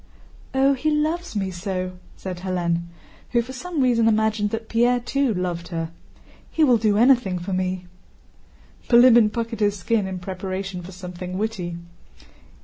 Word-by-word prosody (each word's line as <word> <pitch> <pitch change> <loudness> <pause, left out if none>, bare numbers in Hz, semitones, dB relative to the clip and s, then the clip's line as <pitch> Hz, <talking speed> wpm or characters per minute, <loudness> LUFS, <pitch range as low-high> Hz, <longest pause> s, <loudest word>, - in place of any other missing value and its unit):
"Oh, 270 +1 +4
he 275 +4 0
loves 310 +1 -1
me 195 -2 -1
so!" 185 0 -4 0.2
said 185 -2 -6
Hélène, 175 -2 -1 0.5
who 240 - +4
for 255 +3 -9
some 320 +3 -3
reason 235 -3 +3
imagined 215 -1 +2
that 225 +1 -4
Pierre 240 +2 +3
too 270 +2 0
loved 180 -3 -2
her. 165 -2 -4 0.6
"He 320 - +1
will 250 -5 +5
do 210 -2 +2
anything 235 -6 +4
for 180 +2 -4
me." 185 0 -1 1.0
Bilíbin 235 -3 +7
puckered 230 -1 -3
his 205 -1 +2
skin 205 +2 0
in 190 -1 -4
preparation 190 0 -5
for 175 +2 -10
something 180 0 -7
witty. 190 -5 -3
205 Hz, 150 wpm, -23 LUFS, 185-240 Hz, 1.0 s, Bilíbin